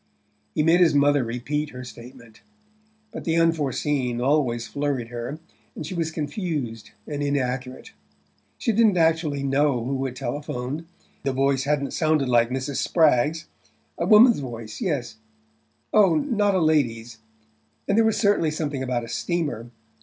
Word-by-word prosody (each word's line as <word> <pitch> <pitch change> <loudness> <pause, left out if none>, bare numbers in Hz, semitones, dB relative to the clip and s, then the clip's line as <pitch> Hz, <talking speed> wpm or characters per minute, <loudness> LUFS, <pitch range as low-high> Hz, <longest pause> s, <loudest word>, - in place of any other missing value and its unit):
He 150 - +2
made 165 +3 +4
his 170 -4 +4
mother 145 -1 +4
repeat 140 +6 -3
her 125 -1 -9
statement; 120 -2 -13 0.7
but - - -7
the 165 - 0
unforeseen 145 -6 0
always 125 -3 +1
flurried 140 -1 -3
her, 120 +5 -5 0.4
and 155 - -6
she 160 - -6
was 165 -2 -1
confused 150 - -4 0.2
and 145 -1 -5
inaccurate. 130 -3 -2 0.7
She 235 - 0
didn't 220 -3 +3
actually 160 -4 +1
know 135 -2 +1
who 135 +1 -2
had 130 -1 -4
telephoned: 145 +3 -4 0.3
the 135 -1 -1
voice 135 0 +1
hadn't 140 -1 0
sounded 155 -4 +1
like 120 -1 +3
Mrs. 130 +2 -3
Spragg's... 155 0 +2 0.5
A - - 0
woman's 230 - +7
voice; 115 -5 -7
yes 125 - -2 0.8
oh, 195 -6 +5
not 205 - +1
a - - +3
lady's! 120 -8 0 0.7
And 200 - +2
there 225 - +5
was 220 - +2
certainly 200 -7 +2
something 150 -3 -3
about 125 -2 -1
a - - -7
steamer... 150 -8 -3
145 Hz, 145 wpm, -24 LUFS, 125-160 Hz, 0.8 s, woman's